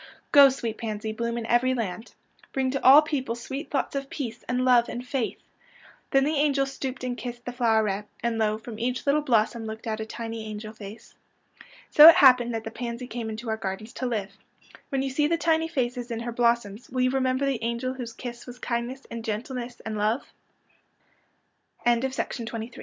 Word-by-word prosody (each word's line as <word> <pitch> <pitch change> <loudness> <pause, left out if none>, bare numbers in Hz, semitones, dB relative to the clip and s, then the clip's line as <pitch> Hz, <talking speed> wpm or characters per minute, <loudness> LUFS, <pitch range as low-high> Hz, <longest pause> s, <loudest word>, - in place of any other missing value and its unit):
" - - -38
Go, 280 -1 +9
sweet 235 -4 -4
pans}^, 215 -1 -4
bloom 235 +1 -2
in 230 - -4
every 250 +3 +2
land. 220 -1 -5 0.4
Bring 265 -1 0
to 275 - -3
all 280 +4 +9
peojjle 265 -6 -2
sweet 270 +5 -6
thoughts 285 - -1
of 275 0 -3
peace 240 -5 -5
and 250 +1 +1
love 245 -2 +5
and 245 +1 -6
faith." 255 -3 -2 0.7
Then 270 0 +4
the 300 +3 +1
angel 280 -1 +2
stooped 270 -1 -5
and 250 -1 -2
kissed 240 -1 -7
the 245 - -3
floweret, 220 -4 +1 0.2
and 235 -1 0
lo, 215 -1 +1
from 220 0 -9
each 250 +2 -2
little 290 +2 +3
blossom 230 -3 +1
looked 220 +2 -7
out 220 -1 -2
a 220 - -3
tiny 225 -1 -5
angel 215 0 -7
face. 215 0 -11 0.8
So 305 +2 +11
it 335 - +8
happened 250 -3 +6
that 225 - -3
the 225 - -6
pansy 235 +1 -5
came 235 -2 -5
into 220 +2 -6
our 220 0 -1
gardens 210 +2 -5
to 255 - -3
live. 210 -5 -2 0.6
^'\nien 270 -1 0
you 270 - -2
see 295 +3 +2
the 335 +2 +1
tiny 325 -1 +2
faces 245 -6 -2
in 230 -1 -3
her 240 0 -4
blossoms 235 -2 0
will 255 0 -1
you 255 0 +3
remember 260 0 +1
the 270 -4 -1
angel 235 +2 -2
whose 245 -3 -7
kiss 240 +1 -8
was 245 0 -9
kindness 245 +2 -3
and 230 -1 -5
gentleness 240 +3 -5
and 215 -1 -3
lo 215 +5 +1
240 Hz, 195 wpm, -26 LUFS, 225-260 Hz, 0.8 s, So